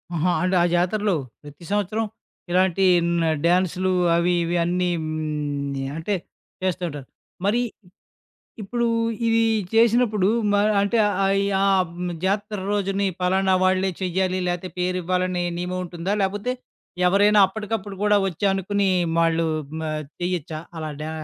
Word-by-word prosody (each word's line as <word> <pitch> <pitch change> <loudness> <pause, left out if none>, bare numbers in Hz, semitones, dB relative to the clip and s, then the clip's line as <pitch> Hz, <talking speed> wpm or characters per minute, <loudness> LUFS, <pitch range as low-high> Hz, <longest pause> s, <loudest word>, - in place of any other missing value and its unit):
ఆహా! 175 +3 +1
అంటే 185 0 +1
ఆ - - +4
జాతరలో 195 +3 +1 0.3
ప్రతి 145 +3 -13
సంవత్సరం 205 +2 0 0.5
ఇలాంటీ 185 +1 +3 0.4
న - - +1 0.2
డ్యాన్సులు 185 +1 +2 0.2
అవీ, 170 +1 +2
ఇవీ 170 +1 -1
అన్నీ 180 +1 0
హ్మ్, 150 -3 -3
య 135 - -3
అంటే, 180 +5 -1 0.5
చేస్తుంటారు. 175 -7 -2 0.4
మరీ 230 +5 +2 1.0
ఇప్పుడూ 235 +4 -1 0.4
ఇదీ 230 0 +3 0.3
చేసినప్పుడు, 225 -3 +3 0.2
మా 205 0 +3 0.2
అంటే, 200 +4 +1 0.3
ఆహ్, 195 0 +2 0.2
యా 195 0 +2 0.3
హ్మ్, 175 0 -4
జాతర 205 +2 -1
రోజుని 200 -1 0
పలానా 190 +1 +2
వాళ్ళే 185 +1 +2
చెయ్యాలి, 185 0 0
లేతే 175 +1 -3
పేరివ్వాలనే 180 0 0
నియమముంటుందా, 180 +1 -3
లేపోతే 205 +6 -1 0.5
ఎవరైనా 205 +3 +4
అప్పడికప్పుడు 210 -1 -5
గూడా 210 0 +4
ఒచ్చి 185 +2 -3
అనుకునీ 195 +1 0 0.3
వాళ్ళూ 165 0 +2 0.3
మ - - -4 0.4
చెయ్యచ్చా 175 -3 -2 0.2
అలా 155 -1 -4
డా 155 - -4
185 Hz, 125 wpm, -23 LUFS, 175-205 Hz, 1.0 s, ఆ